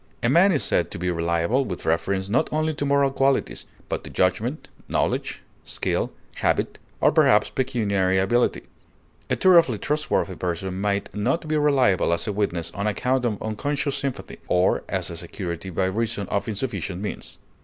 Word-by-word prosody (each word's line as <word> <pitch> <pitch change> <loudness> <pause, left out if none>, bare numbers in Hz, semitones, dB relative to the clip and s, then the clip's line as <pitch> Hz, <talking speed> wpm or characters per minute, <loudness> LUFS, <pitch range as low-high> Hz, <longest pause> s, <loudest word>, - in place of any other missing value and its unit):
A 115 - +3
man 175 +8 +5
is 145 - +1
said - - +1
to - - -6
be 90 +1 -1
reliable 85 +9 +1
with 95 -8 -6
reference 95 +4 0
not 125 +9 +1
only 155 +1 0
to 145 -1 -2
moral 140 -1 +3
qualities, 135 0 0 0.2
but - - -3
to - - -9
judgment, 105 - 0 0.2
knowledge, - - -1 0.2
skill, - - -2 0.3
habit, - - 0 0.2
or - - +4
perhaps - - +4
pecuniary 100 -7 +1
ability; 120 +6 +1 0.7
a - - +2
thoroughly 170 - +5
trustworthy 150 -8 -1
person 90 +2 -3
might 100 -1 -1
not 130 +11 -1
be 155 - 0
reliable 135 - +3
as 85 - -1
a 105 - -2
witness 85 -5 -1
on 100 +1 -2
account 125 +4 0
of 110 -4 -2
unconscious 140 +6 -2
sympathy, 135 -2 -4
or 90 +1 +2
as - - -2
a - - -6
security 90 -1 -5
by 95 +1 0
reason 105 +1 -1
of 100 0 -1
insufficient 100 -5 -3
means. 105 - -6
105 Hz, 165 wpm, -24 LUFS, 95-135 Hz, 0.7 s, man